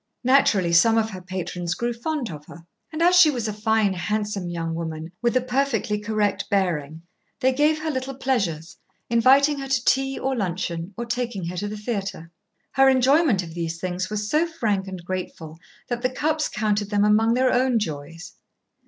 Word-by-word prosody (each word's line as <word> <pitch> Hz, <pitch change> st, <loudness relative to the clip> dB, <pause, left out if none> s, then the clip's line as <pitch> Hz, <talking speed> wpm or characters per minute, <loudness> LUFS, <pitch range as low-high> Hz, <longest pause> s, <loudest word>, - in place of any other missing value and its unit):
Naturally 220 Hz, -9 st, +3 dB
some 225 Hz, +7 st, +5 dB
of 220 Hz, 0 st, +1 dB
her 185 Hz, -1 st, -8 dB
patrons 180 Hz, -1 st, -4 dB
grew 240 Hz, 0 st, -2 dB
fond 250 Hz, -, -3 dB
of 150 Hz, -2 st, -9 dB
her, 170 Hz, -1 st, -13 dB, 0.3 s
and 320 Hz, +1 st, -1 dB
as 355 Hz, +1 st, +5 dB
she 355 Hz, -3 st, +8 dB
was 240 Hz, -6 st, -2 dB
a 215 Hz, -, -3 dB
fine, 215 Hz, -1 st, +1 dB
handsome 205 Hz, 0 st, -2 dB
young 165 Hz, -1 st, -3 dB
woman 160 Hz, 0 st, -5 dB
with 240 Hz, +1 st, +2 dB
a -, -, +2 dB
perfectly 250 Hz, -5 st, 0 dB
correct 210 Hz, -2 st, -1 dB
bearing, 165 Hz, -5 st, -1 dB, 0.4 s
they 260 Hz, +1 st, +2 dB
gave 300 Hz, +3 st, +2 dB
her 315 Hz, -, -1 dB
little 260 Hz, -1 st, -4 dB
pleasures, 195 Hz, -, -2 dB, 0.3 s
inviting 275 Hz, +5 st, +4 dB
her 270 Hz, -, -5 dB
to 260 Hz, -2 st, 0 dB
tea 270 Hz, 0 st, +2 dB
or 265 Hz, 0 st, -1 dB
luncheon, 175 Hz, -4 st, -3 dB
or 235 Hz, -, -3 dB
taking 235 Hz, -6 st, -3 dB
her 180 Hz, -, -6 dB
to 205 Hz, -, -2 dB
the 210 Hz, +1 st, -5 dB
theatre. 200 Hz, -6 st, -4 dB, 0.4 s
Her 270 Hz, 0 st, +5 dB
enjoyment 265 Hz, -, +3 dB
of 165 Hz, -2 st, -9 dB
these 165 Hz, -1 st, -4 dB
things 185 Hz, +1 st, -3 dB
was 210 Hz, 0 st, -3 dB
so 310 Hz, +7 st, +2 dB
frank 210 Hz, -12 st, -1 dB
and 185 Hz, -3 st, -8 dB
grateful 170 Hz, -3 st, -6 dB, 0.3 s
that 240 Hz, -1 st, -3 dB
the 255 Hz, -, +1 dB
Cupps 305 Hz, +4 st, -1 dB
counted 210 Hz, -1 st, -1 dB
them 205 Hz, -1 st, +2 dB
among 220 Hz, +2 st, +3 dB
their 255 Hz, 0 st, +2 dB
own 250 Hz, -1 st, +2 dB
joys. 165 Hz, -2 st, -5 dB
210 Hz, 190 wpm, -23 LUFS, 180-255 Hz, 0.4 s, she